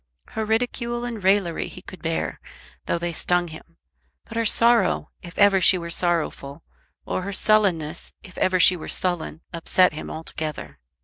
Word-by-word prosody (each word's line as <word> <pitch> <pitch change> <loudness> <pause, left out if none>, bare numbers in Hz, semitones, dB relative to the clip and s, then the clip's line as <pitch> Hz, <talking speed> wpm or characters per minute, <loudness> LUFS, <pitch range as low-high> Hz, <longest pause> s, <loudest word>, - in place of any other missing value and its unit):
Her 220 - -3
ridicule 240 +2 -1
and 230 -5 -5
raillery 190 -3 +2
he - - -11
could - - -11
bear, - - -2 0.5
though - - +1
they 170 0 -3
stung 175 +1 0
him; 165 +1 -13 0.5
but 225 - -11
her 230 0 0
sorrow, 235 +2 +3
if 175 -2 -12
ever 200 -2 +5
she 185 - +6
were 170 -1 -5
sorrowful, 165 -4 -1 0.4
or - - -2
her 200 +2 -5
sullenness, 185 -7 +1
if 185 - -14
ever 185 0 +2
she 180 - +6
were 170 - -8
sullen, 175 -3 -2
upset 175 +1 +3
him 155 - -7
altogether. 155 - -6
180 Hz, 165 wpm, -23 LUFS, 165-210 Hz, 0.5 s, she